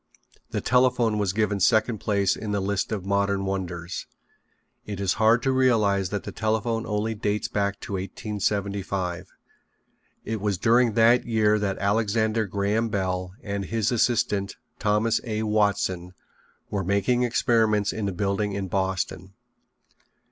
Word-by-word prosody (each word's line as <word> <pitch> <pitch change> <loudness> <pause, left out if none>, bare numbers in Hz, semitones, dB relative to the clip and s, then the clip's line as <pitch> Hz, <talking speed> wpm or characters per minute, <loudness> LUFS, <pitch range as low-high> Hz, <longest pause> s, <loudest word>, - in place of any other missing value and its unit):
The - - -2
telephone 125 -4 +2
was 100 -3 +1
given 105 0 0
second 110 +2 +3
place 100 -2 +1
in 105 -1 -4
the 100 - +1
list 100 +2 -1
of 100 -4 -3
modern 100 0 0
wonders. 90 -3 -4 0.8
It 100 -2 -6
is 95 -2 +1
hard 115 +2 +4
to 135 - +2
realize 110 -8 +2
that 105 0 -3
the - - -6
telephone 110 +1 -1
only 105 +1 -1
dates 105 -1 -1
back 100 -1 -1
to - - -6
1875. 100 -2 -3 1.0
It 110 -1 -3
was 100 -2 0
during 115 +2 +3
that 115 +2 +4
year 105 -2 +3
that 100 -2 -1
Alexander 110 +1 +1
Graham 100 +4 0
Bell 90 -3 -2
and 100 -1 -3
his 115 +2 0
assistant, 105 -4 +1 0.2
Thomas 105 +2 +1
A. 110 -2 -2
Watson, 100 -4 0 0.6
were 100 -2 -1
making 100 +6 +1
experiments 115 -4 +2
in 105 -2 -2
a - - -3
building 100 +2 -1
in 100 -1 -3
Boston. 95 0 -2
105 Hz, 140 wpm, -25 LUFS, 100-110 Hz, 1.0 s, hard